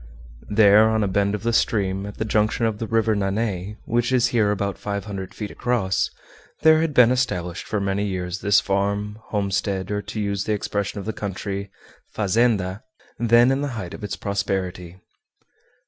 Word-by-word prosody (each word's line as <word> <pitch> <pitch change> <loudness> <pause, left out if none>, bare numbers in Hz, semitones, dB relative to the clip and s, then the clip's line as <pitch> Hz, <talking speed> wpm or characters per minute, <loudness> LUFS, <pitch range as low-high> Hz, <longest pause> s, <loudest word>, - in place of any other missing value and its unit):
There, 105 +1 +6
on 110 -1 +1
a - - +1
bend 100 +1 +1
of 105 - -7
the 115 0 0
stream, 100 -3 +1
at 105 - -9
the 110 - -2
junction 110 +2 +1
of 110 -2 -1
the 115 - -3
River 110 -1 +2
Nanay, 100 0 -2
which 120 +2 0
is 125 -1 +3
here 110 -4 +2
about 100 -2 -2
five 100 -1 -4
hundred 95 -3 -6
feet 105 -2 -5
across, 115 -6 0 0.5
there 160 0 +6
had 160 -3 -1
been 125 -1 +7
established 90 -10 -1
for 105 - -1
many 100 +1 -1
years 90 -1 -3
this 100 +1 +4
farm, 100 +2 -1
homestead, 100 -1 -1
or, 105 0 -1
to 100 +2 -6
use 100 -1 -1
the 110 - 0
expression 100 0 -2
of 100 - -7
the 110 - -3
country, 100 0 -4 0.5
"fazenda," 105 -2 +1 0.4
then 120 +2 +5
in 135 +1 0
the 145 - -1
height 90 -5 -6
of - - -9
its 100 -2 -3
prosperity. 95 -3 -3
105 Hz, 180 wpm, -23 LUFS, 95-110 Hz, 0.5 s, been